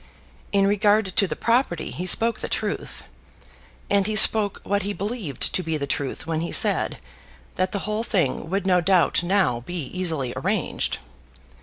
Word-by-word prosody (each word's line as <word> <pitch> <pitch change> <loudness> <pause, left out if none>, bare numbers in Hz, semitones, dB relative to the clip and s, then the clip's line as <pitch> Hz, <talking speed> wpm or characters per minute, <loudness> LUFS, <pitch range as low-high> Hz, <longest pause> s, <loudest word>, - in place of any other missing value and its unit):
In 195 -1 +3
regard 205 -1 +2
to 200 -3 +3
the - - -4
property 235 -6 0
he 180 - -5
spoke 230 +5 +3
the - - -5
truth, - - -4 0.8
and 200 -1 +2
he 215 - -1
spoke 215 -2 +5
what 200 0 0
he 205 +1 -3
believed 200 - -3
to - - +1
be 160 -2 -2
the 140 - -3
truth 140 0 -3
when 160 0 -2
he 170 - -4
said - - +2 0.6
that 185 0 -1
the 200 - -3
whole 215 +1 -1
thing 165 - -1
would 195 +1 -1
no 180 -2 +3
doubt 180 -1 +3
now 175 -9 +1
be 175 +9 -8
easily 160 -5 -2
arranged. - - -1
190 Hz, 170 wpm, -23 LUFS, 165-205 Hz, 0.8 s, spoke